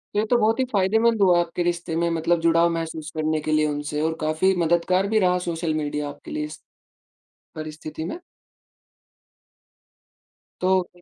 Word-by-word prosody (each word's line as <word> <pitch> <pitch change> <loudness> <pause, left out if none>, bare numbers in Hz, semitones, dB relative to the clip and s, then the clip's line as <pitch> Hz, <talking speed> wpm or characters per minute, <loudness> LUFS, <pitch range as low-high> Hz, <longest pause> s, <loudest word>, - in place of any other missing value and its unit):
ये 210 - +2
तो 245 - +4
बहुत 225 +2 +2
ही - - +4
फ़ायदेमंद 220 +3 +2
हुआ 180 -2 +5
आपके 175 +1 -1
रिश्ते 170 -1 -2
में 170 0 +1
मतलब 165 +1 +1
जुड़ाव 165 +1 +4
महसूस 160 -1 -4
करने 155 0 0
के 155 - -3
लिए 155 0 +3
उनसे 145 0 -3
और 160 +1 0
काफ़ी 155 +5 +2
मददगार 175 +3 +2
भी 220 +1 +2
रहा 180 -1 +3
सोशल 165 -1 -1
मीडिया 150 -1 -2
आपके 145 - -11
लिए 150 - -2
इस, 150 0 -10 0.9
परिस्थिति 155 0 -7
में। 335 - -5 2.4
तोI 185 -1 0
170 Hz, 160 wpm, -23 LUFS, 155-185 Hz, 2.4 s, हुआ